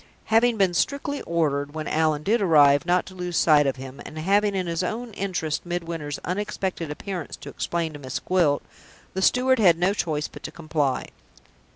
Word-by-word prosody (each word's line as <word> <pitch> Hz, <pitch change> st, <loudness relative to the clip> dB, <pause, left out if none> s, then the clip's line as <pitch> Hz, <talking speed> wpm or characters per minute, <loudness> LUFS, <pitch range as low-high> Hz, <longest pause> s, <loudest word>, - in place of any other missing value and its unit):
Having 230 Hz, +1 st, +4 dB
been 190 Hz, -3 st, +3 dB
strictly 280 Hz, +8 st, -1 dB
ordered, 145 Hz, -3 st, 0 dB
when 155 Hz, -1 st, -4 dB
Allan 155 Hz, -1 st, +1 dB
did 220 Hz, +5 st, +2 dB
arrive, 145 Hz, -4 st, +5 dB
not 180 Hz, +1 st, +2 dB
to 190 Hz, -, -11 dB
lose 180 Hz, -2 st, -3 dB
sight 150 Hz, -3 st, +5 dB
of 135 Hz, -, 0 dB
him, 135 Hz, +1 st, -9 dB
and 155 Hz, -, -10 dB
having, 200 Hz, +5 st, +2 dB
in 185 Hz, -1 st, -1 dB
his 170 Hz, 0 st, -2 dB
own 225 Hz, +5 st, -4 dB
interests, 180 Hz, -6 st, -2 dB
Midwinter's 165 Hz, -4 st, -4 dB
unexpected 190 Hz, -3 st, -3 dB
appearance 175 Hz, +1 st, -5 dB
to -, -, -10 dB
explain 170 Hz, -2 st, -2 dB
to 145 Hz, -, -8 dB
Miss 130 Hz, -2 st, -4 dB
Gwilt, 170 Hz, -6 st, +1 dB, 0.5 s
the 190 Hz, -, -2 dB
steward 255 Hz, +4 st, +3 dB
had 175 Hz, -6 st, +5 dB
no 180 Hz, +3 st, +2 dB
choice 155 Hz, -6 st, -1 dB
but -, -, -12 dB
to -, -, -6 dB
comply. 155 Hz, -5 st, -1 dB
170 Hz, 185 wpm, -24 LUFS, 150-195 Hz, 0.5 s, arrive